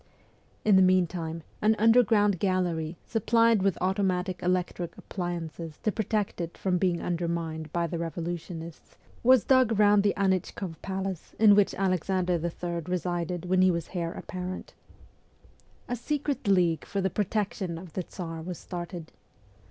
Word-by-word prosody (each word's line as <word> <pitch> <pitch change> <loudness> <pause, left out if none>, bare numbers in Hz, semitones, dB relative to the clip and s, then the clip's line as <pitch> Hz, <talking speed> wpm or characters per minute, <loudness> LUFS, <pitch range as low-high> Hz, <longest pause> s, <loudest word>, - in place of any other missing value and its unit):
In 205 -3 +6
the - - +6
meantime, 175 -3 +1 0.2
an 215 +1 +4
underground 215 -4 +4
gallery, 175 -4 0
supplied 230 -1 +3
with 195 -2 +1
automatic 185 -1 0
electric 180 -1 -1
appliances 170 -3 -5
to 215 - +2
protect 210 -3 -1
it 170 0 -5
from 180 -2 0
being 180 -2 +1
undermined 165 -2 -3
by 170 0 0
the 170 0 -3
revolutionists, 170 0 -6 0.2
was 255 -3 +6
dug 255 -5 +4
round 205 -1 +5
the 205 0 +1
Anfchkoff 190 -3 -1
palace 190 -2 -4
in 210 -2 +7
which 200 -1 +3
Alexander 185 -2 0
III. 170 0 -3
resided 175 -1 -2
when 185 +1 +3
he 185 - +6
was 170 -2 -2
heir 170 -2 -2
apparent. 185 +1 -6 1.1
A 245 - -1
secret 285 0 -2
league 175 -4 +3
for 200 - -3
the 190 -1 0
protection 200 -3 -2
of 170 -2 -10
the 185 - -2
Tsar 165 -2 -7
was 175 +1 -5
started. 175 -2 -7
180 Hz, 145 wpm, -28 LUFS, 170-200 Hz, 1.1 s, in